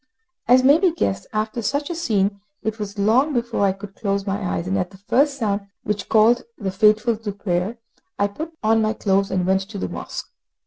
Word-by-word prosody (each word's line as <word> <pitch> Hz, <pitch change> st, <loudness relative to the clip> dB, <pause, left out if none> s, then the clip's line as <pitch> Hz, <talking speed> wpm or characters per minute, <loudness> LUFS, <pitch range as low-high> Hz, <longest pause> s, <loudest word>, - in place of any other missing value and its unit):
As 255 Hz, +2 st, +6 dB
may 285 Hz, +4 st, +6 dB
be 370 Hz, -2 st, +3 dB
guessed, 100 Hz, -, -2 dB
after 215 Hz, +2 st, -2 dB
such 285 Hz, +8 st, -1 dB
a -, -, -3 dB
scene 205 Hz, -, 0 dB, 0.2 s
it 220 Hz, 0 st, -3 dB
was 205 Hz, 0 st, -5 dB
long 240 Hz, +9 st, +3 dB
before 235 Hz, -4 st, 0 dB
I 195 Hz, -, +4 dB
could 195 Hz, +1 st, -9 dB
close 200 Hz, -1 st, -2 dB
my 200 Hz, +1 st, -2 dB
eyes, 175 Hz, -2 st, -2 dB
and 190 Hz, +1 st, -1 dB
at 180 Hz, -1 st, -1 dB
the 195 Hz, -, -15 dB
first 275 Hz, +8 st, +1 dB
sound 205 Hz, -4 st, -1 dB, 0.2 s
which 205 Hz, -2 st, -3 dB
called 225 Hz, +3 st, +5 dB, 0.2 s
the 195 Hz, -2 st, -3 dB
faithful 215 Hz, +4 st, +3 dB
to 215 Hz, -1 st, -4 dB
prayer, 195 Hz, +2 st, -2 dB, 0.4 s
I 200 Hz, -, +2 dB
put 305 Hz, +12 st, -5 dB
on 225 Hz, +1 st, +4 dB
my 215 Hz, 0 st, +1 dB
clothes 195 Hz, -2 st, +1 dB
and 185 Hz, -1 st, 0 dB
went 190 Hz, +1 st, +2 dB
to 215 Hz, -, -7 dB
the -, -, -2 dB
mosque. -, -, -6 dB
210 Hz, 215 wpm, -22 LUFS, 195-235 Hz, 0.4 s, As